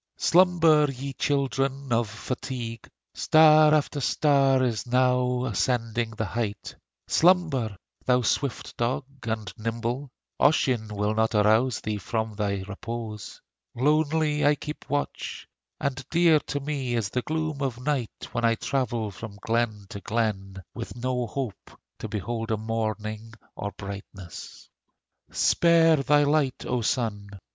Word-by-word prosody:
Slumber, 165 -4 +4
ye 135 +1 -6
children 135 -1 -1
of 115 -2 +1
fatigue; 115 +1 -5 0.2
Star 155 -1 +6
after 150 -1 +1
star 135 -2 +3
is 120 -2 -1
now 125 0 +2
ascending 115 0 0
the 110 - -1
height. 110 -1 -4 0.3
Slumber! 160 - +3 0.3
thou 125 -1 +2
swift 135 +2 -1
dog 120 +3 -1 0.2
and 110 -4 -3
nimble 115 +5 -3 0.3
Ossian 130 -7 +3
will 105 0 -1
arouse 110 +2 +3
thee 110 -1 -2
not - - -9
from 110 +2 -2
thy 100 -2 -2
repose. 110 0 -7 0.3
Lonely 150 +3 +2
I 145 +1 +5
keep 150 +1 -8
watch, 145 +1 -3 0.3
And 135 -1 -2
dear 165 -2 +5
to 145 - -2
me 140 -4 -2
is 110 -4 -1
the 125 - -1
gloom 155 0 -3
of 130 -4 -2
night 130 -3 -3
When 120 -1 -2
I 115 0 +4
travel 120 -5 -2
from 100 +1 -9
glen 115 -3 -1
to 100 - -7
glen, 95 -4 -2
With 115 - -7
no 125 0 -2
hope 125 -2 -6 0.2
to - - -5
behold 115 +2 -4
a 110 - +1
morning 110 0 -4 0.2
or 100 - -4
brightness. 100 -2 -9 0.6
Spare 165 -1 +4
thy 145 +1 +3
light, 145 -3 +1
O 125 -1 -1
Sun! 110 -4 -1
120 Hz, 135 wpm, -26 LUFS, 110-140 Hz, 0.6 s, Star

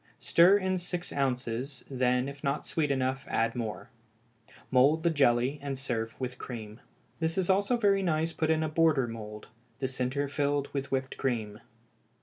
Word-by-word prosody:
Stir 180 +4 +5
in 185 -2 0
six 180 0 -4
ounces, 130 -1 -2
then 125 -1 +1
if 140 0 -9
not 140 +2 -1
sweet 155 -3 0
enough 130 -1 -1
add 115 +1 +1
more; 115 -3 -5 0.8
mould 140 +5 +4
the 170 - +3
jelly, 135 -1 +2
and 140 -1 -4
serve 115 -4 -3
with 130 -1 -4
cream. 110 -3 -7 0.4
This 160 +1 0
is 190 0 +3
also 200 +6 +2
very 200 -3 +3
nice 165 -2 0
put 160 - -1
in 160 0 +2
a - - 0
border 155 -4 +3
mould, 105 -2 -8 0.3
the 135 - -1
centre 130 +2 -1
filled 145 0 0
with 140 -1 -3
whipped 135 0 -2
cream. 110 -5 -2
140 Hz, 165 wpm, -29 LUFS, 125-160 Hz, 0.8 s, Stir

